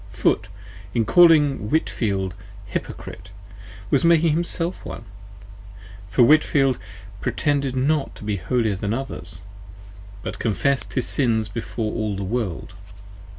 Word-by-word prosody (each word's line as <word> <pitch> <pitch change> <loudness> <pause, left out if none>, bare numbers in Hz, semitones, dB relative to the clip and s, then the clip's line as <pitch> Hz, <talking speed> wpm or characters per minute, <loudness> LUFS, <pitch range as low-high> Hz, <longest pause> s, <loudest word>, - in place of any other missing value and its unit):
Foote - - +1 0.5
in 115 -2 +2
calling 150 -9 +5
Whitefield, 100 - 0 0.3
Hypocrite, 95 -1 -6 0.6
was 140 - +4
himself 170 +1 +1
one: - - -7 1.1
for 120 - +4
Whitefield 135 -1 +4 0.4
pretended 140 -3 0
not 140 +3 0
to - - -11
be 105 -1 -1
holier 110 +1 0
than 100 +3 -2
others: 95 -9 -7 0.8
but - - -5
confessed 125 +6 0
his 130 - -1
Sins 110 -5 +1
before 110 0 -4
all 110 -2 -2
the 100 - -4
World. 100 -4 -3
120 Hz, 110 wpm, -23 LUFS, 105-145 Hz, 1.1 s, calling